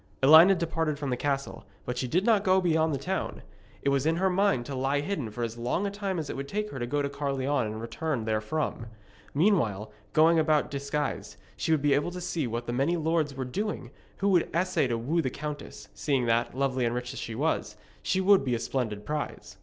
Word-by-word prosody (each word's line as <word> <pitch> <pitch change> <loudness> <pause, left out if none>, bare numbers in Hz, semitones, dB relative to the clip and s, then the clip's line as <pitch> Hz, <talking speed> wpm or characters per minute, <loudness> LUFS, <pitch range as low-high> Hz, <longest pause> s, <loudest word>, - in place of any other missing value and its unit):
Elined 160 +7 +8
departed 165 -2 -1
from 140 -2 -3
the - - +1
castle, 140 +1 -2 0.2
but 125 - -3
she 125 +1 -2
did 180 +9 +1
not 220 -4 +4
go 190 -1 +4
beyond 160 -3 +2
the 140 - 0
town. 185 +8 -3 0.4
It - - +2
was 140 +1 +1
in 165 - +3
her 190 +2 +1
mind 190 -10 +2
to 140 - -6
lie 135 +2 0
hidden 145 - -3
for 120 +3 -5
as 115 0 -4
long 125 +11 -1
a 200 - -1
time 200 -2 -3
as 155 -3 -3
it - - -5
would 140 +1 -5
take 210 +5 -3
her 135 - -6
to 120 - -2
go 145 +3 0
to - - 0
Caerleon 140 -2 -1
and 110 +1 -5
return 115 +2 -3
therefrom. 115 +3 -2 0.5
Meanwhile, 115 - +2 0.2
going 160 +1 +5
about 155 -1 +2
disguised, 140 +1 -3 0.2
she - - -2
would 155 -3 +2
be 145 -1 +4
able 145 +5 +1
to 180 +1 -6
see 165 -5 -2
what 120 +1 -3
the 120 - -3
many 140 +8 +1
lords 160 -3 0
were 130 -1 -3
doing 160 - -4 0.3
who 200 - +1
would 180 -4 +3
essay 180 -5 +1
to 120 -2 -1
woo 150 +9 0
the 130 - -1
countess, 150 +2 -7
seeing 135 -4 0
that, 120 +2 +1
lovely 130 -2 0
and 120 0 0
rich 125 +1 -4
as - - -6
she 115 - -5
was, 120 -6 -1 0.2
she 190 - 0
would 195 -2 +5
be 125 -3 0
a - - -2
splendid 110 -4 -3
prize. 150 -1 -5
145 Hz, 230 wpm, -28 LUFS, 125-165 Hz, 0.5 s, Elined